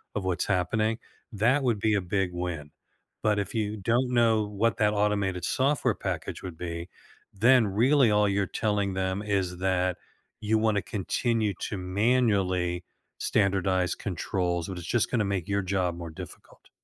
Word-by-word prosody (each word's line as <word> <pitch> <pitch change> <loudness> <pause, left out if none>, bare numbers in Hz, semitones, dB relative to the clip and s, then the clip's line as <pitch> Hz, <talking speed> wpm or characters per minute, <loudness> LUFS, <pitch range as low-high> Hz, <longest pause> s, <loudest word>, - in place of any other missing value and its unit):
of 105 - -2
what's 90 -2 0
happening, 110 +4 +1 0.3
that 120 +7 +2
would 120 -5 +1
be 110 +1 +2
a 100 - +1
big 95 0 -1
win. 85 -5 -4 0.5
But 105 -1 +2
if 100 - -3
you 105 -1 -1
don't 120 +6 +1
know 115 -3 +3
what 105 0 0
that 105 -1 +2
automated 100 -4 0
software 140 +1 +1
package - - -4
would 90 -4 -7
be, 85 0 -5 0.4
then 120 +3 +5
really 120 +5 +4
all 105 0 +4
you're 100 0 +1
telling 105 -1 -1
them 95 +1 -1
is 95 -4 -1
that 90 -1 +1 0.4
you 110 +1 +2
wanna 110 -2 +2
continue 110 +2 -1
to 100 - -3
manually 95 -3 +1 0.4
standardize 95 -2 +1
controls, 90 -2 -2
but 95 - -6
it's 85 - -7
just 120 +3 +1
gonna 115 -4 +1
make 100 -4 -2
your 100 0 0
job 90 -2 0
more 85 -1 -6
difficult. - - -12
100 Hz, 160 wpm, -27 LUFS, 90-110 Hz, 0.5 s, then